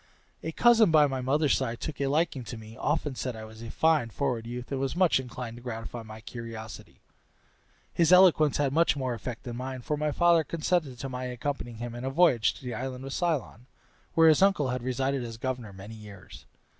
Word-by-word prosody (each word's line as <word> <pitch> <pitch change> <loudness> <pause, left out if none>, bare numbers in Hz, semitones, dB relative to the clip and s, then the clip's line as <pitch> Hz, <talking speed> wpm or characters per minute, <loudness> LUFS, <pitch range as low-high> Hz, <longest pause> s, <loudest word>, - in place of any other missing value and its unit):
A 160 - -4
cousin 230 +2 +5
by 155 -2 +6
my 135 -2 -2
mother's 140 +3 +2
side 120 -3 -2
took 150 -3 -5
a 140 - +1
liking 145 -2 0
to 115 +2 -7
me, 110 0 -11
often 150 +1 -1
said 125 -1 -4
I 110 - -8
was 110 +1 -11
a 115 - -7
fine 155 -6 +2
forward 120 -3 -2
youth, 120 +2 -6
and 135 -1 -2
was 135 +2 -2
much 175 -6 +4
inclined 125 -2 -7
to - - -11
gratify 115 -1 -6
my 110 0 -10
curiosity. 115 -2 -9 0.9
His 170 -1 +3
eloquence 180 -5 +6
had 140 -2 +1
more 140 -5 +2
effect 120 0 -6
than 120 -2 -6
mine, 130 0 -5
for 150 +4 -2
my 150 0 0
father 170 +1 +4
consented 155 -3 -1
to 135 - -5
my 130 -1 -5
accompanying 125 -1 -4
him 120 +1 -5
in 120 +1 -7
a 130 - -1
voyage 135 -6 +3
to - - -14
the 125 - -3
island 130 +2 -5
of 135 - -5
Ceylon, 145 - -2 0.5
where 165 0 +7
his 155 - +4
uncle 195 -9 +3
had 125 0 -2
resided 130 +1 -1
as 115 -1 -7
governor 125 -3 -4
many 95 +3 -10
years. 105 -3 -12
130 Hz, 210 wpm, -28 LUFS, 120-150 Hz, 0.9 s, where